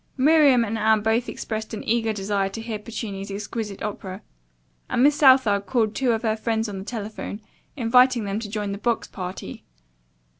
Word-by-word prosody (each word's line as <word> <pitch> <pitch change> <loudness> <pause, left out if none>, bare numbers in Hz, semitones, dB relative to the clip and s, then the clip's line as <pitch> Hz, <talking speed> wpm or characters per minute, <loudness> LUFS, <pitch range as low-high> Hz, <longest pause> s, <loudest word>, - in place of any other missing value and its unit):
Miriam 280 -3 +5
and 225 +1 -3
Anne 220 -1 +3
both 225 +2 +1
expressed 220 0 -5
an - - -6
eager 225 0 +1
desire 200 -1 -1
to 195 - -7
hear 225 -2 -4
Puccini's 205 -3 -6
exquisite 205 +1 -5
opera, 195 -1 -6 0.7
and 245 - +2
Miss 295 +1 +5
Southard 260 -9 +5
called 225 -4 +1
two 255 0 +1
of 225 - -2
her 220 -1 +1
friends 225 0 -1
on 200 -2 -5
the - - -6
telephone, 215 -2 -6 0.4
inviting 250 0 +4
them 200 +1 -2
to 220 -2 -6
join 205 -1 -3
the 200 - -5
box 235 +1 -1
party. 185 0 -7
220 Hz, 180 wpm, -24 LUFS, 205-235 Hz, 0.7 s, Miriam